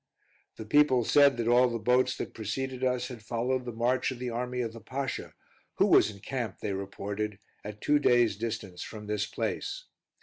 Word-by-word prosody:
The 110 - -8
people 130 0 +4
said 140 +1 +5
that 115 -1 -1
all 125 +1 +5
the 120 - -2
boats 125 +3 +2
that - - -5
preceded 130 +4 -4
us 125 0 0
had 120 -3 -8
followed 125 +3 -1
the 120 - -4
march 120 +3 +1
of 130 - -5
the 125 0 -4
army 125 +1 -2
of 115 -2 -3
the 115 - -10
Pasha, 130 +4 -4 0.4
who - - +4
was - - +5
encamped, 110 +1 -5
they 105 - -3
reported, 100 +1 -4 0.3
at 105 0 -8
two 150 0 +3
days' 120 -6 +4
distance 110 -4 -5
from 105 -1 -7
this 105 -1 -1
place. - - -3
120 Hz, 190 wpm, -29 LUFS, 105-130 Hz, 0.4 s, said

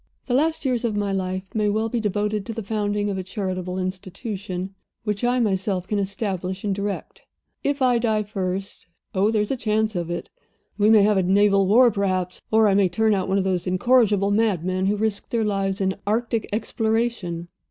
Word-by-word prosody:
The 245 - -2
later 300 +1 +1
years 245 -2 0
of 225 -3 0
my 205 -1 0
life 190 0 -3
may 210 -1 +1
well 220 +2 0
be 235 +1 -1
devoted 210 0 -1
to 230 - -3
the 225 0 -5
founding 205 0 -1
of 190 - -3
a - - -3
charitable 185 -1 -4
institution, 185 0 -5 0.3
which 210 -1 -2
I 245 +1 +2
myself 190 -4 0
can 205 0 0
establish 190 -2 -3
and 205 -2 0
direct. 200 +1 -4 0.4
If 280 -1 0
I 245 -2 +4
die 220 -2 +1
first 195 -3 -4 0.3
oh, 200 +2 +2
there 215 -2 +2
is 210 - -4
a - - +1
chance 220 -2 0
of 175 -1 -2
it! 175 - -5 0.4
We 210 0 +3
may 220 -2 +7
have 210 0 +3
a - - +4
naval 195 +1 +3
war, 240 +4 +6
perhaps, 185 -3 -1
or 220 0 +4
I 200 - +3
may 195 -2 +4
turn 220 +5 +2
out 190 -1 -1
one 195 - +2
of 195 - +2
those 185 -2 -1
incorrigible 205 0 +3
madmen 190 -3 +1
who 205 +1 +1
risk 210 -1 -2
their 230 -2 0
lives 195 -1 -1
in 190 -1 +1
Arctic 225 +1 0
exploration. 220 -6 -1
205 Hz, 200 wpm, -23 LUFS, 190-220 Hz, 0.4 s, may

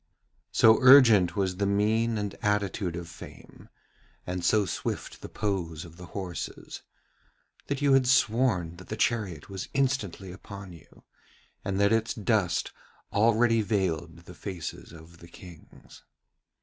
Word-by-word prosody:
So 110 0 +5
urgent 115 -10 +7
was 95 -2 -1
the 100 0 0
mien 110 +3 +1
and 105 -1 -3
attitude 105 -4 -1
of 85 -1 -6
Fame, 85 - -13 0.6
and 90 0 -4
so 105 +4 +3
swift - - -5
the - - -8
pose 90 -6 -3
of 85 0 -14
the 90 -1 -10
horses, 90 -3 -7 0.9
that 140 0 -3
you 140 -1 +4
had 135 -1 +4
sworn 110 -9 +2
that 90 - -13
the 110 - -5
chariot 105 -10 -1
was 95 -2 -7
instantly 110 -9 -1
upon 95 0 -10
you, 85 - -18 0.6
and 100 0 -2
that 100 +2 +3
its 115 0 0
dust 105 -4 0 0.4
already 115 +1 +3
veiled 85 -5 -2
the 90 - -11
faces 90 -3 -7
of 85 +1 -15
the 85 - -13
Kings. 85 -1 -15
100 Hz, 140 wpm, -27 LUFS, 90-110 Hz, 0.9 s, urgent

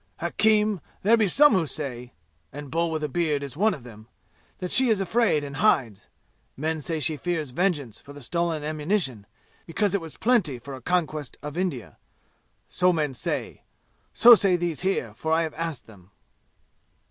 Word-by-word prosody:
"Hakim, 210 +2 +1 0.2
there 220 +4 +5
be 220 -3 +2
some 295 +9 +5
who 175 -5 +1
say 125 -4 -6 0.4
and 145 0 -9
Bull 170 +1 0
with 160 -1 -3
a - - 0
beard 150 -1 -1
is 140 -3 -8
one 210 +6 +2
of 135 - -13
them 110 -2 -13 0.5
that 180 -1 -5
she 260 -1 +5
is 215 -3 +2
afraid 195 -5 +1
and 145 0 -7
hides. 115 -7 +1 0.5
Men 160 +2 -2
say 160 +2 -3
she 155 +1 -1
fears 160 -4 -3
vengeance 145 - -1
for 145 - -14
the 145 - -11
stolen 165 +3 -2
ammunition, 150 - -2 0.4
because 185 +4 0
it 200 - 0
was 160 -2 -9
plenty 210 - +2
for 135 +3 -10
a 130 - -9
conquest 155 -2 -2
of 150 0 -6
India. 175 -10 -4 0.7
So 180 0 +2
men 150 -5 -1
say. 125 - -4 0.5
So 240 +1 +8
say 195 -5 +4
these 175 -3 -2
here, 180 - -1
for 160 +8 -4
I 165 +1 +3
have 160 - -4
asked 160 -5 -5
them." 95 -4 -17
160 Hz, 180 wpm, -25 LUFS, 140-180 Hz, 0.7 s, So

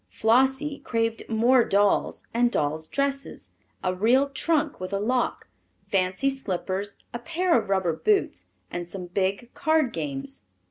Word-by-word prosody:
Flossie 265 +5 +2
craved 225 -1 -1
more 235 +3 +4
dolls 200 -1 +1
and 240 +1 +3
dolls' 155 -1 -1
dresses, 275 - -3 0.3
a 185 -1 +1
real 245 +9 +3
trunk 300 +1 0
with 185 +1 -5
a 195 - 0
lock, 245 +4 -1 0.4
fancy 190 +6 +1
slippers, 200 -5 -3 0.2
a 240 - -3
pair 345 +3 +1
of - - 0
rubber 190 -4 +1
boots, 405 - 0 0.2
and 175 0 -4
some 180 +1 -6
big 195 +6 -2
card 315 -5 +1
games. 140 -5 -4
225 Hz, 140 wpm, -26 LUFS, 185-270 Hz, 0.4 s, more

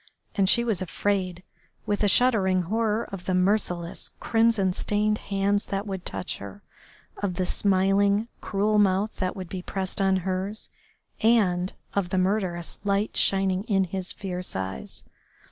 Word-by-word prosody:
And 195 -2 +2
she 235 - +5
was 220 -6 0
afraid, 185 -1 -1 0.4
with 205 0 0
a - - +4
shuddering 195 -6 +3
horror, 220 +4 0
of 195 -3 -7
the 185 - 0
merciless, 180 -3 0
crimson 225 -5 +2
stained 210 +2 0
hands 200 +1 0
that 195 +1 -2
would 190 -3 -5
touch 95 -1 -4
her, 100 0 -10 0.5
of 195 -3 -2
the 185 0 0
smiling, 200 +3 +2
cruel 210 +1 +1
mouth 200 +1 +2
that 185 -1 -2
would 185 -2 -6
be 185 +1 -5
pressed 190 +1 -3
on 190 -1 +3
hers, 190 +3 -3 0.5
and 195 -6 +3 0.2
of 195 -3 0
the 185 - -1
murderous 185 -3 -1
light 200 +1 0
shining 195 -1 +3
in 195 -3 +2
his 185 0 -1
fierce 180 -2 -5
eyes. 95 -8 -5
195 Hz, 150 wpm, -26 LUFS, 185-205 Hz, 0.5 s, she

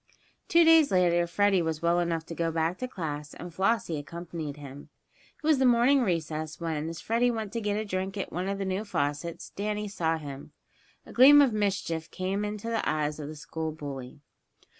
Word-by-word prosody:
Two 340 0 +5
days 325 -2 +6
later 175 -2 +3
Freddie 200 +1 +2
was 160 -1 -3
well 170 +1 +3
enough 165 -2 -1
to 170 - -7
go 165 0 -1
back 165 +2 -1
to 255 - -3
class, 150 - -5
and 175 -1 -9
Flossie 190 -4 0
accompanied 160 -1 -6
him. 140 -1 -10 0.5
It - - -6
was 310 -2 +4
at - - -3
the 265 - +3
morning 245 +3 +4
recess 160 -6 -2
when, 160 -2 -2
as 165 0 -7
Freddie 235 +2 +1
went 220 -4 -3
to 230 - -2
get 205 -1 -1
a 215 - -2
drink 190 0 -3
at 195 - -4
one 180 +3 -2
of 200 - -2
the 195 - -3
new 190 +2 -1
faucets, 145 -3 -3
Danny 210 +1 -3
saw 165 -5 -1
him. 140 -3 -9 0.5
A - - -12
gleam 275 +4 +8
of 275 -5 +5
mischief 190 -6 -1
came 190 +2 -2
into 210 +1 -4
the 230 -1 0
eyes 150 0 -1
of 145 - -5
the 155 - -7
school 155 +2 -5
bully. 140 -3 -8
175 Hz, 205 wpm, -28 LUFS, 160-210 Hz, 0.5 s, gleam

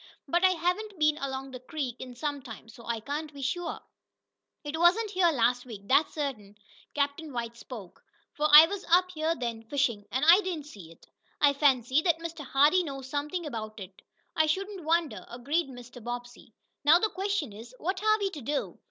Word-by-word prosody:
But 345 +1 +1
I 375 - +7
haven't 365 +4 -2
been 305 0 +2
along 270 0 -4
the 255 - -7
creek 255 -2 -5
in 255 -1 -8
some 290 +1 -3
time, 225 -2 -11
so 230 +1 -14
I 230 -1 -2
can't 295 +5 -4
be 280 -2 -8
sure." 340 +6 -3 0.8
"It 295 +1 -4
wasn't 390 +5 +4
here 365 -3 +3
last 245 -2 +1
week, 225 -6 -9
that's 275 +8 +3
certain," 220 -9 -4 0.4
Captain 285 +2 -1
White 235 -2 -4
spoke. 225 -6 -11 0.3
"For 300 +1 +1
I 300 +2 +12
was 390 +3 -5
up 365 +2 +4
here 320 0 -1
then 235 -5 -4
fishing, 235 -5 -1
and 260 +4 0
I 345 +5 +8
didn't 345 -7 -4
see 195 - -12
it. 165 - -18 0.3
I 285 -1 +5
fancy 270 -1 +3
that 335 -1 +2
Mr. 330 -2 -7
Hardee 290 +7 +4
knows 270 -5 -7
something 300 +4 -2
about 220 -5 -6
it." 190 -1 -11 0.3
"I 315 0 +3
shouldn't 385 +2 -2
wonder," 330 -1 0
agreed 275 +6 -1
Mr. 245 -2 -11
Bobbsey. 240 -1 -7 0.3
"Now 305 +4 +7
the 435 +4 +1
question 385 - -2
is: 230 +4 -11
What 370 +6 -3
are 430 0 +4
we 400 -2 -1
to 305 -6 -8
do? 285 +4 -3
290 Hz, 195 wpm, -28 LUFS, 245-335 Hz, 0.8 s, I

